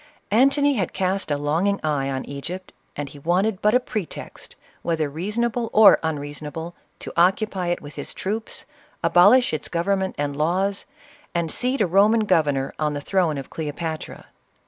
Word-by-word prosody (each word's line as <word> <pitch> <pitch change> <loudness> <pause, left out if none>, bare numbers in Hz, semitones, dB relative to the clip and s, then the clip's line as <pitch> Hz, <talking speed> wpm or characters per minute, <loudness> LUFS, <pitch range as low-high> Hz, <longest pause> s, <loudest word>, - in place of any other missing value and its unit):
Antony 275 +5 +4
had 190 -5 -1
cast 190 0 -1
a 145 - +1
longing 165 +8 0
eye 145 -3 0
on 130 -1 -3
Egypt, 175 +7 -7 0.2
and 145 -1 -4
he 145 - -12
wanted 185 +6 0
but 210 +3 +3
a - - +6
pretext, 215 -7 -7 0.3
whether 160 -3 0
reasonable 220 +9 -2
or 215 -1 +8
unreason 150 -1 -4
able, 165 +4 -6 0.2
to - - -8
occupy 185 +1 +2
it 175 - -1
with 145 0 -9
his 145 - -7
troops, 215 +4 -4 0.4
abolish 210 +7 +5
its 155 - -3
govern 190 +3 0
ment 190 0 -3
and 145 -1 -2
laws, 185 - 0 0.5
and 170 -2 0
seat 255 +1 0
a - - +4
Roman 205 +5 +4
governor 150 -9 +1
on 150 -1 0
the - - -2
throne 170 -2 +1
of 135 - -7
Cleopatra. 160 +1 -5
175 Hz, 170 wpm, -23 LUFS, 150-205 Hz, 0.5 s, or